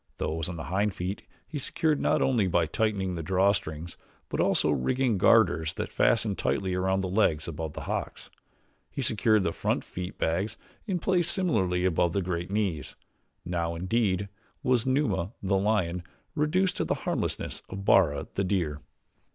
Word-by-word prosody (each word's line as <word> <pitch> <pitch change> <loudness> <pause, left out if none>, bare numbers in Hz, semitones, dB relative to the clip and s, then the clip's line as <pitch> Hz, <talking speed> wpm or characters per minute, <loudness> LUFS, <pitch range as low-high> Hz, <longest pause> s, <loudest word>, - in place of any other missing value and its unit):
Those 80 +1 -2
on 90 - -5
the 80 - -5
hind 95 +4 0
feet 90 +3 -4 0.2
he 150 - -4
secured 150 +2 0
not - - +2
only 120 -7 +2
by 85 -2 +2
tightening 100 +1 -1
the 85 - -3
draw 95 +4 +3
strings 80 -3 -5 0.3
but - - -3
also - - +3
rigged 120 - +1
garters 85 -8 +4
that - - -4
fastened 110 -4 +2
tightly 95 -2 0
around 95 +1 +1
the 95 - -2
legs 90 -6 +1
above 80 -1 -4
the - - -6
hocks. - - -4 0.6
He 135 - -4
secured 110 -2 +3
the 85 - 0
front - - -1
feet 90 +1 -6
bags 95 +7 -1 0.3
in 190 -3 0
place 175 0 +1
similarly 95 - +1
above 85 -1 +2
the 100 - 0
great 85 0 -3
knees. 100 -7 -2 0.5
Now, 85 -1 -1
indeed, 100 +1 0 0.4
was 125 -2 +2
Numa, 110 - +1
the 95 0 +2
lion, 95 -4 +1 0.3
reduced 165 +5 +1
to - - +1
the - - 0
harmlessness - - -2
of 100 +1 -6
Bara, 75 -9 +4
the 95 - 0
deer. 85 -6 -1
95 Hz, 165 wpm, -28 LUFS, 85-110 Hz, 0.6 s, garters